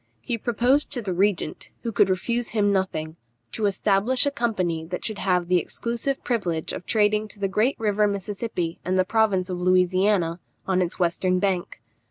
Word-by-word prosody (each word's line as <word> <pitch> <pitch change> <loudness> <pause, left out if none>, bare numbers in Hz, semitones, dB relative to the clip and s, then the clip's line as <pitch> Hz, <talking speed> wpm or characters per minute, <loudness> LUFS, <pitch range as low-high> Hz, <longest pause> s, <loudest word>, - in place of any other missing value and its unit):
He 130 - -2
proposed 245 +5 +1
to 245 - 0
the 190 -3 -2
regent 190 -3 0
(who 230 - -2
could 200 -2 +3
refuse 235 +6 -1
him 205 -2 +2
nothing) 165 -4 -2 0.3
to 215 -2 0
establish 205 +6 +2
a 285 - +1
company 185 - -1
that 180 +2 -5
should 220 -3 -3
have 180 -2 +1
the 180 0 +4
exclusive 235 +8 -3
privilege 180 - -1
of - - -7
trading 215 0 +2
to 210 - -12
the 200 - 0
great 215 +8 +1
river 210 -1 +2
Mississippi 200 -3 -3
and 185 +1 0
the 185 - +3
province 200 -3 +2
of 180 -1 -4
Louisiana, 185 -1 +2 0.3
on 185 -1 +1
its 175 -1 -2
western 180 +1 +1
bank. 180 - -1
195 Hz, 180 wpm, -24 LUFS, 180-220 Hz, 0.3 s, the